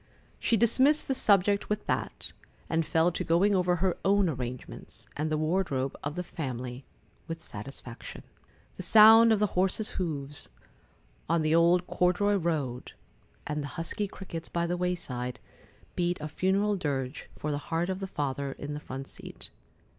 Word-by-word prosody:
She 230 - +2
dismissed 260 +7 +4
the 270 - +1
subject 200 -4 +3
with 210 0 -1
that, - - -2 0.3
and 165 0 +1
fell 165 +2 +3
to - - -3
going 185 +5 +3
over 180 -2 +2
her 180 +1 +1
own 195 -2 +3
arrangements 125 -3 -6
and 155 +1 -1
the 155 - +1
wardrobe 155 -5 0
of 145 +1 -3
the 180 - -2
family, 130 -6 -5 0.4
with 165 0 -5
satisfaction. 125 -2 -8 0.5
The - - -5
sound 225 +4 +8
of 220 - +5
the 210 - +3
horses' 190 +4 +1
hoofs 145 -4 -3 0.8
on 165 -1 +2
the 155 0 +2
old 170 +2 +4
corduroy 185 +4 +2
road, 150 -8 -2 0.5
and 150 0 -2
the 145 - -4
husky 170 +5 -2
crickets 170 -4 -7
by 170 0 0
the 175 +1 -1
wayside, 135 -9 -3 0.6
beat 175 0 0
a 150 - -4
funeral 195 +6 +1
dirge 135 -5 -3
for 150 - -3
the 145 - -1
heart 170 +2 0
of 190 - -4
the 195 - -4
Father 140 -4 -3
in 145 +1 -6
the 145 - -4
front 135 -1 -7
seat. - - -6
170 Hz, 160 wpm, -29 LUFS, 145-190 Hz, 0.8 s, sound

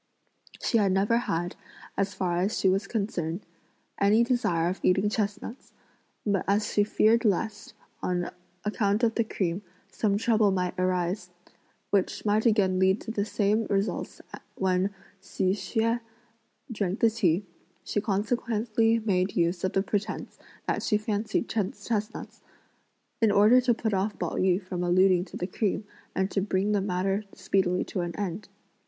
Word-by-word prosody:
She 230 - +3
had 200 -2 +3
never 200 +4 +2
had, 175 -7 -2 0.4
as 195 -1 -1
far 180 -2 0
as 195 +5 0
she - - +2
was 195 +1 +2
concerned, 195 -5 -2 0.5
any 210 +3 +5
desire 220 -9 +1
of 185 +2 -2
eating 195 +3 +3
chestnuts, 215 +3 -4 0.5
but 200 -3 +1
as 205 +2 +1
she 205 - +4
feared 220 +3 +3
lest, 210 0 -1 0.3
on 175 -1 -1 0.3
account 210 +1 +1
of 225 -1 +3
the 230 - +1
cream, 185 -4 -2 0.3
some 200 -2 +1
trouble 220 -1 +3
might 180 -2 0
arise, 180 0 0 0.6
which 200 +1 0
might 215 +3 +3
again 195 -4 +3
lead 190 +2 +3
to 225 - -5
the 205 -2 -1
same 215 +1 +1
results 200 +1 -1
as - - -7 0.2
when 185 0 +1 0.3
Hsi 190 -1 0
Hsüeh 230 +3 0 0.7
drank 200 -3 -2
the 230 - +4
tea, 195 -3 +1 0.4
she 205 - -1
consequently 225 +2 +1
made 195 -4 0
use 170 +1 +1
of 190 - 0
the 195 - +2
pretence 205 0 -3 0.3
that - - -1
she 210 - +2
fancied 215 +1 -1
chestnuts, 210 0 -3 0.8
in 225 - +5
order 215 +5 +6
to 245 -2 +2
put 220 -2 -1
off 195 +2 0
Pao - - -2
yü 185 -1 +2
from 180 -1 -4
alluding 180 0 +4
(to - - -9
the 180 - -2
cream) 200 +2 -1 0.3
and 190 +1 0
to 195 - 0
bring 195 +1 0
the 205 -1 +2
matter 195 +1 0
speedily 185 -1 +1
to 185 - -3
an 175 -1 -4
end. 200 0 -4
200 Hz, 160 wpm, -27 LUFS, 185-215 Hz, 0.8 s, order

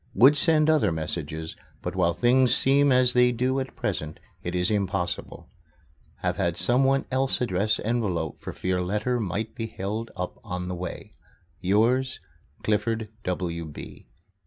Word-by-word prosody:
Would 130 +8 +7
send 155 +1 +3
other 150 - +3
messages, 80 0 -4 0.3
but - - -4
while 85 -2 +2
things 125 +1 +4
seem 140 +1 +4
as 125 -1 +4
they 125 0 +5
do 130 +3 0
at 130 0 -5
present 75 0 -3 0.2
it 90 +1 -4
is 90 +3 +3
impossible. 95 -3 -2 0.8
Have - - 0
had 85 0 0
someone 135 +2 +3
else 130 +1 +1
address 105 -2 +1
envelope 100 -9 -2
for - - -5
fear 90 0 -1
letter 105 +7 -1
might 110 +2 -3
be 115 - -4
held 110 +3 -4
up 90 -1 -5
on 90 0 -4
the - - -2
way. 90 0 -6 0.5
Yours, 120 +8 +2 0.4
CLIFFORD 110 +1 0 0.2
W. 85 -3 -3
105 Hz, 145 wpm, -26 LUFS, 90-125 Hz, 0.8 s, Would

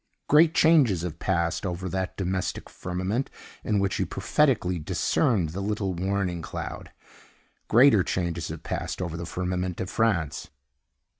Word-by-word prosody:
Great 160 +2 +5
changes 135 - +4
have 85 -3 -5
passed 85 -3 0
over 95 -1 -3
that 95 0 -3
domestic 95 -1 -3
firmament 95 +8 -2 0.3
in 105 -3 +1
which 100 -1 0
he - - +1
prophetically 115 - +1
discerned 90 +3 +1
the 90 +5 -5
little 100 -2 -1
warning 90 -1 -1
cloud. - - -6 0.8
Greater 120 -4 +6
changes 85 -3 -2
have - - -7
passed - - -4
over 85 -3 -3
the 85 0 -5
firmament 90 0 -3
of 95 - -4
France. 85 -9 0
95 Hz, 140 wpm, -26 LUFS, 85-105 Hz, 0.8 s, Greater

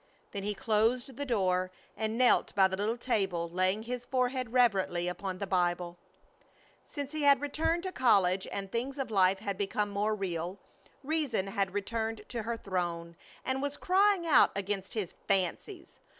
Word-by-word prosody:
Then 200 - -4
he 205 +1 -2
closed 230 +5 +1
the 285 +3 -4
door 185 -5 +1 0.3
and 220 +1 -2
knelt 250 -1 +3
by 190 -2 +6
the 190 - -3
little 210 +4 -1
table, 195 -9 0
laying 185 +4 +1
his 245 +1 -4
forehead 255 -1 -1
reverently 195 -8 +2
upon 185 +1 -4
the 200 - -3
Bible. 175 -2 0 0.9
Since 285 -2 -6
he 310 -1 -3
had 280 -2 +6
returned 325 +4 -1
to 375 - -3
college 195 - +3
and 195 -1 -5
things 260 +4 -3
of 270 -4 -3
life 190 -2 +4
had 200 -2 -3
become 205 +1 -1
more 210 +2 0
real, 180 -2 -3 0.5
Reason 280 -9 0
had 195 -1 -2
returned 220 +1 -2
to 235 - -3
her 230 +2 -3
throne 175 -4 -3 0.3
and 260 0 -1
was 285 0 -3
crying 385 -1 +3
out 320 - +6
against 195 0 -3
his 205 -6 -3
"fancies." 195 - -2
210 Hz, 165 wpm, -31 LUFS, 190-255 Hz, 0.9 s, by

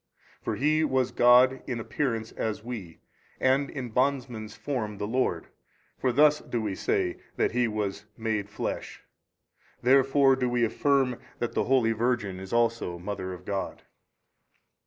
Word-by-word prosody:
For - - -2
He 155 +4 +2
was 130 -4 +1
God 125 +2 +5
in 125 -3 -2
|243 - - -5
appearance 115 -3 -2
as 110 -1 -3
we, 105 -9 -7 0.4
and 135 +2 +2
in 130 -4 -5
bondman's 125 -4 -1
form 110 -2 -3
the 105 - -3
Lord, 125 +5 -1 0.5
for 130 - 0
thus 150 +3 +5
do 120 - -3
we 105 -3 -2
say 95 -1 0 0.2
that - - +1
He 125 0 +2
was 105 -2 -3
MADE 110 -3 -2
FLESH. - - -5 0.8
Therefore 135 +1 +5
do 125 -1 0
we 120 -1 +2
affirm 130 +1 +1 0.2
that 120 - -3
the - - 0
holy 125 -3 +3
Virgin 115 -4 -1
is 95 0 -9
also 115 -6 +1
mother 95 +1 -5
of 90 0 -9
God. 100 -1 -4
120 Hz, 155 wpm, -27 LUFS, 105-130 Hz, 0.8 s, God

